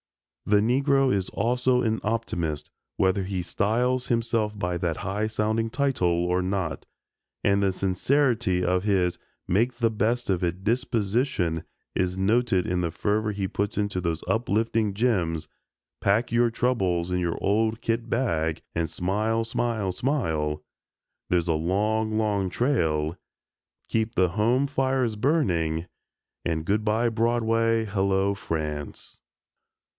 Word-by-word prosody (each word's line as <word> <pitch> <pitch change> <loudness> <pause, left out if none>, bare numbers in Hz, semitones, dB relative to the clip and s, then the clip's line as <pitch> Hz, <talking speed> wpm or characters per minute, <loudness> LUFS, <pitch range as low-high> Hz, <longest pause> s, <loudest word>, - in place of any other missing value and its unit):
The 105 - +5
Negro 135 +3 +3
is 95 -2 -1
also 125 +3 +1
an 110 -1 0
optimist, 85 -9 -2 0.3
whether 95 +1 +2
he 95 -1 -3
styles 125 +8 0
himself 115 -3 0
by 90 -3 -1
that 85 -3 -1
high 105 +3 -2
sounding 110 +1 0
title 95 -11 +1
or 90 +1 +1
not, 95 -3 -2 0.6
and 100 0 +3
the 100 -1 +2
sincerity 100 0 +1
of 90 +1 +1
his 95 -4 +1 0.3
"make 115 +7 +2
the 115 -2 +2
best 115 +3 0
of 90 -1 0
it" 90 +2 -2
disposition 110 - 0 0.3
is 90 0 0
noted 105 -1 +2
in 90 0 0
the 85 - 0
fervor 105 +5 0
he 100 -2 -2
puts 100 +1 -2
into 100 -3 -1
those 85 -2 -2
uplifting 110 -2 +1
gems, 90 -9 0 0.5
"Pack 105 +5 +3
Up 120 - -19
Your 120 0 +3
Troubles 95 -8 0
in 90 - +1
Your 85 -2 -1
Old 110 +3 +1
Kit 115 0 -2
Bag 80 -10 0
and 85 -1 0
Smile, 105 +7 0
Smile, 115 -4 -1
Smile," 80 - -1 0.7
"There's 85 -1 +1
a 85 - +2
Long, 105 +7 0
Long 100 -3 +1
Trail," 85 - 0 0.7
"Keep 110 0 -1
the 90 0 +3
Home 115 +9 +2
Fires 130 -4 0
Burning," 90 - +1 0.6
and 80 -1 -2
"Good 105 +4 +1
bye 110 +2 +2
Broadway, 115 0 +1
Hello 100 -1 +1
France." 75 -6 -5
105 Hz, 135 wpm, -26 LUFS, 90-115 Hz, 0.7 s, The